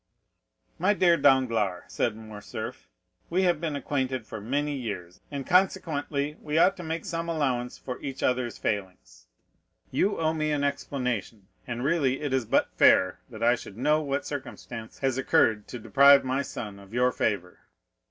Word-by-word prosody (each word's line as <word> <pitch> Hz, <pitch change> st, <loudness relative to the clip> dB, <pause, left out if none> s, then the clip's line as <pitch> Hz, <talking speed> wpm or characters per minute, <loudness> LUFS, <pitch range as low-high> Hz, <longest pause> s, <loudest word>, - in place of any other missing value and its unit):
"My 195 Hz, +5 st, +3 dB
dear 175 Hz, -3 st, +5 dB
Danglars," 115 Hz, -, +2 dB
said 115 Hz, -, -1 dB
Morcerf, 110 Hz, -2 st, -8 dB, 0.4 s
"we 185 Hz, +3 st, +1 dB
have 175 Hz, -4 st, +2 dB
been 160 Hz, -3 st, -2 dB
acquainted 130 Hz, -4 st, -2 dB
for 110 Hz, -1 st, -7 dB
many 145 Hz, +7 st, -1 dB
years, 95 Hz, -9 st, -6 dB
and 140 Hz, -2 st, -5 dB
consequently 150 Hz, -5 st, +1 dB
we 150 Hz, +1 st, -2 dB
ought 185 Hz, +4 st, +5 dB
to 180 Hz, -, -7 dB
make 160 Hz, 0 st, -4 dB
some 170 Hz, -2 st, -3 dB
allowance 130 Hz, -6 st, -1 dB
for 125 Hz, -, -7 dB
each 135 Hz, -1 st, -5 dB
other's 125 Hz, -2 st, 0 dB
failings. 95 Hz, -3 st, -4 dB, 0.6 s
You 205 Hz, -, +1 dB
owe 160 Hz, -1 st, +1 dB
me 155 Hz, -1 st, -1 dB
an 145 Hz, -1 st, 0 dB
explanation, 125 Hz, -8 st, -3 dB, 0.2 s
and 120 Hz, 0 st, -4 dB
really 140 Hz, -3 st, +1 dB
it 145 Hz, -3 st, -2 dB
is 130 Hz, -3 st, +1 dB
but -, -, +2 dB
fair 90 Hz, -1 st, +5 dB
that 115 Hz, -2 st, -7 dB
I 120 Hz, +1 st, +5 dB
should 105 Hz, -4 st, -7 dB
know 150 Hz, +5 st, +2 dB
what 140 Hz, -1 st, -2 dB
circumstance 120 Hz, -5 st, -7 dB
has 135 Hz, -1 st, 0 dB
occurred 130 Hz, -7 st, +2 dB
to 125 Hz, -, -6 dB
deprive 140 Hz, +4 st, +6 dB
my 130 Hz, +2 st, 0 dB
son 105 Hz, -7 st, -6 dB
of 100 Hz, +3 st, -12 dB
your 125 Hz, +1 st, +3 dB
favor." 95 Hz, -7 st, -2 dB
130 Hz, 165 wpm, -27 LUFS, 115-150 Hz, 0.6 s, deprive